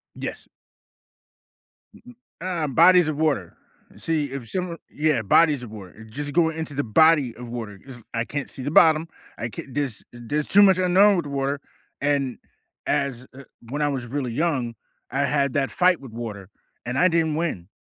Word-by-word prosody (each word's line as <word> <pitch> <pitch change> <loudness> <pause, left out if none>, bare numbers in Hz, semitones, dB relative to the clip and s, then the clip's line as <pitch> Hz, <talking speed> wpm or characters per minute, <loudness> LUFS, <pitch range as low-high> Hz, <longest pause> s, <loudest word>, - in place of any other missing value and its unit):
Yes. - - -6 1.5
Mm-mm, 185 -8 -7
um, 145 -3 -2
bodies 180 +1 +7
of 155 -2 -2
water, 140 - -1 0.4
see, 160 -3 -1
if 135 -4 -7
some 180 -2 -3
yeah, 150 -5 +1
bodies 145 +5 +3
of 115 - -9
water, 105 0 -11
just 145 +5 -4
go 165 -1 +4
into 160 -2 -5
the 145 +1 -1
body 145 +2 +4
of 120 +1 -9
water 110 -4 -6
'cause 120 +1 -12
I 115 0 -1
can't 145 +1 -4
see 130 - -6
the 145 - -2
bottom, 160 0 +5 0.3
I 115 - -4
can't 125 +4 -9
there's 140 -7 -2
there's 120 +5 -3
too 205 - +6
much 190 -2 +6
unknown 185 +2 +5
with 170 - -2
water, 140 0 -2 0.4
and 140 -3 0 0.5
as, 130 -3 -1
uh 140 +1 -11 0.3
when 145 +4 -3
I 150 - +2
was 130 -4 -3
really 130 -1 -3
young, 130 -6 -1 0.4
I 135 - -2
had 140 -2 +1
that 140 -1 0
fight 180 -1 +3
with 135 -4 -10
water, 110 -4 -7 0.4
and 125 +2 -3
I 180 - +6
didn't 165 -2 +1
win. 150 - -3
140 Hz, 180 wpm, -24 LUFS, 120-160 Hz, 1.5 s, bodies